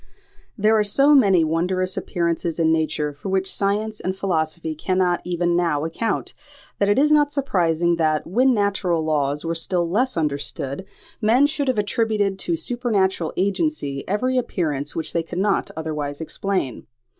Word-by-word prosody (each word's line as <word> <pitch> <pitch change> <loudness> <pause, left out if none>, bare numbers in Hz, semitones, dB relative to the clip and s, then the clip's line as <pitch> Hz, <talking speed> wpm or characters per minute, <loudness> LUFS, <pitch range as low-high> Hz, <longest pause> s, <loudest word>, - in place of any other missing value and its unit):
There 215 +1 +3
are - - +3
so 275 +8 +5
many 195 - +5
wondrous 180 +4 0
appearances 170 -1 -2
in 160 -1 +2
nature 155 -2 -1
for 145 +7 -7
which 190 0 +1
science 210 +2 -1
and 185 +1 -3
philosophy 165 -4 -2
cannot 180 +2 0
even 175 -1 0
now 165 -4 +1
account, 165 +8 -2 0.5
that 200 - +2
it 205 - +3
is 300 +2 +4
not 295 -1 +4
surprising 175 - +1
that, 155 -2 +1
when 250 +9 +3
natural 200 -6 0
laws 150 -1 -1
were 165 - -1
still 175 +1 0
less 240 +6 0
understood, 145 +1 -3 0.4
men 235 +6 +4
should 290 -1 -1
have 260 - +1
attributed 210 -2 0
to 170 -2 -1
supernatural 195 -6 0
agency 195 - -1
every 250 +6 +1
appearance 150 - -3
which 160 - -3
they 170 - +1
could 165 +2 -8
not 200 +2 +1
otherwise 150 -3 -4
explain. 165 - -3
180 Hz, 155 wpm, -22 LUFS, 160-210 Hz, 0.5 s, so